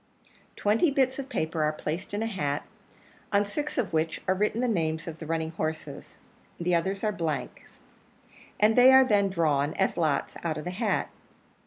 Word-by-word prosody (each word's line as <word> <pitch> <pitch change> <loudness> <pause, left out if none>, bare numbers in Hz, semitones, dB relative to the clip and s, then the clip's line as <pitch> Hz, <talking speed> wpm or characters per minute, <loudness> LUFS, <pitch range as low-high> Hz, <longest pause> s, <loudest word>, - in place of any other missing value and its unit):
Twenty 220 +11 +2
bits 265 -1 +1
of 275 0 -6
paper 160 - -2
are 150 0 +2
placed 155 +3 -5
in 205 +2 -2
a - - -1
hat, 150 -10 -2 0.7
on 205 0 +3
six 290 +10 -4
of 245 -9 -1
which 160 0 0
are 185 - +4
written 210 +4 0
the 250 - +1
names 165 -6 -1
of 165 -1 -7
the 160 - -7
running 160 0 -1
horses 155 -1 -5 0.4
the 175 +1 0
others 190 +3 0
are 215 - +2
blanks 165 -6 -5 0.8
and 215 +1 +4
they 255 +1 +8
are 265 0 +8
then 205 -4 +3
drawn, 155 -5 +1
as 190 - 0
lots, 155 -4 0
out 160 -2 -1
of 155 - -5
the 180 - -4
hat. 210 +3 -1
180 Hz, 185 wpm, -27 LUFS, 160-215 Hz, 0.8 s, they